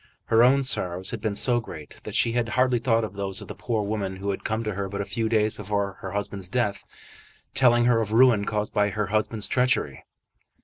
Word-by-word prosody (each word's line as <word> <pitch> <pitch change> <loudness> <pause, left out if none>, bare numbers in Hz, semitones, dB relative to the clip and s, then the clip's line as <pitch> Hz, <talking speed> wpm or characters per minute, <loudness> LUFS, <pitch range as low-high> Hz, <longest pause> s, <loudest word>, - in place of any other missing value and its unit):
Her 115 - +6
own 135 +3 +4
sorrows 90 -8 0
had 115 - -5
been 105 -2 -2
so 120 +3 +3
great 80 -9 -10
that - - -6
she 115 - +3
had 120 -1 -1
hardly 125 -1 +3
thought 115 -1 +1
of 105 -3 -5
those 100 -1 -1
of - - -7
the - - -7
poor 110 -3 -2
woman 100 -2 -3
who 100 +1 -3
had 95 - -6
come 110 +1 -2
to 105 -1 -3
her 100 +1 -4
but 100 +1 -5
a 100 - -2
few 110 +1 -2
days 110 -1 +2
before 100 -1 -3
her 95 -1 -6
husband's 100 -2 -4
death, 105 -4 -1 0.7
telling 120 -2 +4
her 120 -2 +3
of 105 -2 -3
ruin 115 -3 +5
caused 105 0 -2
by 105 0 +2
her 105 +2 -2
husband's 110 -1 +1
treachery. 125 - +1
105 Hz, 225 wpm, -25 LUFS, 100-115 Hz, 0.7 s, Her